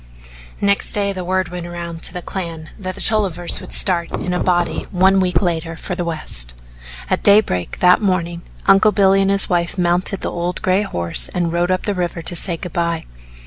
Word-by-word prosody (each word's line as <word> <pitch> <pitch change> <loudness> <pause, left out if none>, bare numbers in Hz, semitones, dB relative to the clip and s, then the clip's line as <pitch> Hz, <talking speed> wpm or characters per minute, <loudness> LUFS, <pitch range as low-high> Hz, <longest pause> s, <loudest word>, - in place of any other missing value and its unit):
Next 200 0 +2
day 200 -1 +1
the 185 -1 -5
word 185 0 -1
went 175 -1 -6
round 170 -1 -7
to - - -1
the 180 -1 -6
clan 165 -4 -6
that 185 -2 -5
the 200 - -9
Tollivers 190 -6 0
would - - -11
start 170 -3 +1
in 180 - -2
a 180 - 0
body 175 -1 0
one 190 +1 +3
week 180 -1 +1
later 165 -2 -2
for 180 - -6
the 175 0 -2
West. 60 - -5 0.5
At - - 0
daybreak, 200 - +3
that 180 +3 +5
morning, 175 -4 -1 0.2
Uncle 195 +2 +5
Billy 195 -1 +4
and 195 - +2
his 195 0 +4
wife 175 0 0
mounted 180 +2 +2
the - - -3
old 175 +1 -3
gray 185 +2 +2
horse 85 - 0
and 175 -2 0
rode 175 +1 0
up 185 0 0
the 205 - 0
river 175 -2 -3
to 175 - -2
say 170 0 +1
good 180 -1 -7
by. 170 -1 -1
180 Hz, 205 wpm, -19 LUFS, 170-190 Hz, 0.5 s, that